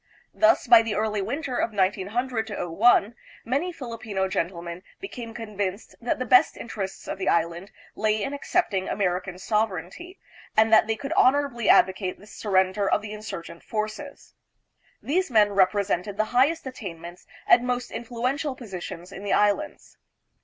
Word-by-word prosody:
Thus, 330 +1 +4
by 235 -2 +8
the 225 -2 -3
early 215 -1 0
winter 255 +5 -3
of 225 - -1
1900 215 +5 -1
01 205 +5 +3 0.3
many 280 +10 -1
Filipino 225 - -4
gentlemen 170 -2 -3 0.2
became 245 -12 -7
con 220 -3 -8
vinced 200 +1 -3
that 235 - -1
the 255 - -3
best 250 +1 +5
interests 200 -4 -6
of - - -5
the 190 - 0
Islands 170 +4 0 0.2
lay 215 -1 0
in 275 - -3
accept 315 - 0
ing 190 -1 -1
American 185 -1 -1
sovereignty, 210 - -2 0.4
and 220 +1 +5
that 220 - +6
they 225 - 0
could 275 +7 -4
honorably 260 -6 +2
advocate 185 0 +3
the 205 - -16
surrender 195 -1 0
of 210 - +1
the 210 0 -6
insurgent 195 -6 -8
forces. 215 +6 -5 0.7
These 365 +5 0
men 215 -4 +4
represented 200 0 +1
the 215 - +2
highest 285 +7 +3
attainments 175 -8 -8 0.2
and 245 +1 +5
most 245 -1 -2
influential 255 +4 -2
po 250 - -11
sitions 180 -3 -7
in 195 - -8
the 205 - 0
Islands. 210 +9 0
215 Hz, 155 wpm, -25 LUFS, 190-245 Hz, 0.7 s, by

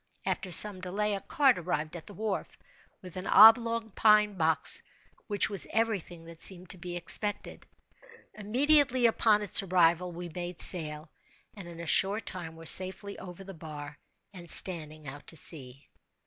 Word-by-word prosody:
After 185 - -4
some 185 +2 +8
delay, 205 +3 -3
a 195 - -5
cart 270 -3 +1
arrived 160 -2 -5
at 170 - -11
the 205 - -12
wharf, 210 0 -5 0.5
with 180 -1 -10
an 185 - -7
oblong 230 0 +5
pine 210 0 +2
box, 160 -3 -1 0.5
which 205 -2 0
was 200 -3 -2
every 225 -2 -1
thing 170 -1 -14
that 165 -1 -12
seemed 185 -1 +3
to 185 - -11
be 175 +1 -7
expected. 205 +4 -3 0.7
Immediately 260 +4 +1
upon 220 -2 +2
its 205 - +1
arrival 180 -1 0
we 175 +1 -8
made 175 +1 -8
sail, 155 -3 0 0.4
and 195 -4 -12
in 170 -1 -12
a 170 - -8
short 200 +6 +1
time 170 -3 -8
were 165 0 -14
safely 190 +4 +3
over 180 +1 -11
the 195 0 -11
bar 150 -3 -11 0.3
and 175 -3 -12
standing 155 -5 0
out 145 +2 -11
to 165 - -6
sea. 135 -3 -9
185 Hz, 165 wpm, -28 LUFS, 165-210 Hz, 0.7 s, some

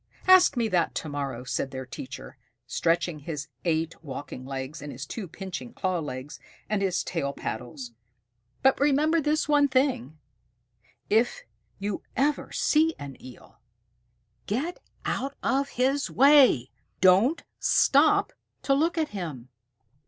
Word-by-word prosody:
"Ask 370 -7 +6
me 230 -2 +2
that 180 -3 +1
to 155 - -3
morrow," 140 -4 -4
said 130 +1 -2
their 130 0 -6
teacher, 130 +2 -9 0.3
stretching 165 +4 0
his 145 -1 -6 0.2
eight 165 0 -1
walking 130 -2 -7
legs 135 +2 -5
and 145 0 -7
his 135 +3 -7
two 195 +6 -6
pinching 190 +7 -7
claw 185 -2 -1
legs 140 -2 -6 0.3
and 210 -2 0
his 190 -2 0
tail 140 -5 -2
paddles, 120 +1 -6 0.7
"but 265 0 +4
remember 295 +3 +3
this 300 +1 +1
one 290 -1 +4
thing: 260 - 0 0.9
if 240 - +2 0.3
you 200 0 -3 0.2
ever 285 +2 +1
see 315 +1 +2
an 140 -2 -8
Eel, 130 -1 -14 0.9
get 280 - -2 0.3
out 275 +1 -2
of 275 +1 +1
his 270 +3 0
way. 275 - +5 0.3
Don't 195 - +4 0.2
stop 320 +9 +4 0.3
to 275 - +2
look 325 +5 +1
at 315 -2 0
him." 155 - -6
190 Hz, 135 wpm, -27 LUFS, -, 0.9 s, Ask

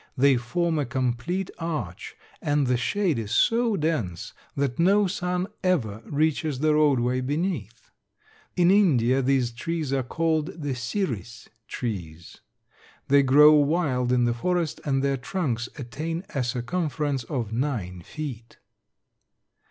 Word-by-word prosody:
They 135 +1 +5
form 160 +7 -1
a 145 - 0
complete 130 +9 -2
arch 150 - -4 0.3
and 145 -1 +1
the 125 0 +2
shade 155 - 0
is 110 -2 -5
so 230 - +3
dense 150 - -2 0.2
that 140 -1 -1
no 200 +4 +4
sun 180 -1 -1 0.2
ever 115 - 0
reaches 155 -1 0
the 155 +3 +2
roadway 130 -4 +2
beneath. 140 - -3 0.6
In 175 0 +4
India 135 - +4
these 130 -2 +1
trees 150 +3 -3
are 135 - +1
called 160 +4 -1
the 145 -3 -2
Siris 120 - -4 0.2
trees. 90 -9 -6 0.7
They 140 +1 +6
grow 145 +3 +7
wild 145 -4 +2
in 125 -1 +3
the 120 - +1
forest 170 +5 -1
and 135 -2 +1
their 140 -1 +1
trunks 125 -4 -2
attain 155 +7 -4
a 135 - 0
circumference 140 +2 -2
of 115 -5 -3
nine 115 -9 -2
feet. 120 - -7
140 Hz, 130 wpm, -25 LUFS, 120-165 Hz, 0.7 s, grow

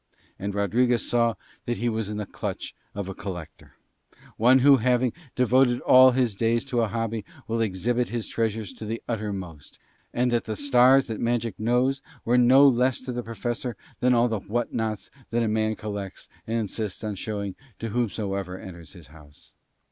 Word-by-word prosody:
And 100 +1 -4
Rodriguez 115 +4 +2
saw 115 -1 +2 0.3
that 120 - -1
he 120 - -1
was 110 -3 -1
in 105 - -4
the 105 - -3
clutch - - -5 0.2
of 100 -2 -4
a 95 - -5
collector, 90 -6 -8 0.6
one 125 +4 +5
who 140 -1 +8
having 125 +1 +2 0.2
devoted 125 0 +3
all 130 0 +8
his 125 -4 +1
days 115 +4 +1
to 125 -3 0
a 115 - +1
hobby 115 -1 -3 0.2
will 115 0 -1
exhibit 115 +4 0
his 120 -2 -3
treasures 110 -3 -2
to 110 - -9
the 115 +2 -4
uttermost, 100 - -5 0.3
and 125 0 +1
that 120 -1 0
the 110 - -3
stars 130 +1 +5
that 110 -2 -5
magic 115 -3 -1
knows 125 +4 +1 0.2
were 120 - +2
no 130 +3 +7
less 125 0 +2
to 130 0 -5
the 120 0 -3
Professor 120 +1 -4 0.2
than 125 0 +3
all 120 +1 +4
the 110 -3 -2
whatnots 110 0 -3 0.2
that 120 0 +1
a - - +1
man 110 0 0
collects 100 -3 -6 0.2
and 115 +1 -1
insists 110 -2 -3
on 105 -1 -2
showing 100 0 -4 0.2
to 115 - -4
whomsoever 100 -5 -2
enters 85 -3 -11
his 85 -5 -13
house. 75 -2 -17
115 Hz, 180 wpm, -25 LUFS, 105-120 Hz, 0.6 s, who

